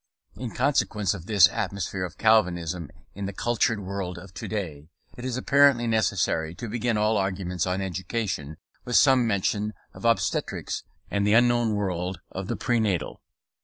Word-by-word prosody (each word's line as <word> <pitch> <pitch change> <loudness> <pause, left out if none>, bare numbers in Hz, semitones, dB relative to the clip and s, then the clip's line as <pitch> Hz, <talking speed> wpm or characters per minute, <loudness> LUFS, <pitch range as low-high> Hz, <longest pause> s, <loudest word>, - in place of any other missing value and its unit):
In 125 - -5
consequence 115 -7 +1
of 95 -3 -9
this 100 -5 +7
atmosphere 95 -1 -3
of 90 0 -9
Calvinism 90 -7 +2 0.2
in 100 0 -4
the 100 - -5
cultured 115 +1 +1
world 95 -2 -4
of 95 +2 -11
to - - -6
day, 80 -8 -5 0.3
it 120 - -9
is 130 -1 -2
apparently 140 -2 +4
necessary 95 -7 0
to 115 - -6
begin 115 0 -1
all 105 +1 +2
arguments 95 -2 -1
on 90 +2 -1
education 95 -5 -3 0.3
with 125 - -2
some 130 -3 +5
mention 105 +1 0 0.2
of - - -12
obstetrics 115 0 0 0.3
and 100 0 +1
the 105 - +4
unknown 120 -2 +3
world 90 -3 -2
of 95 0 -5
the - - -2
prenatal. 110 - -1
100 Hz, 160 wpm, -26 LUFS, 90-115 Hz, 0.3 s, this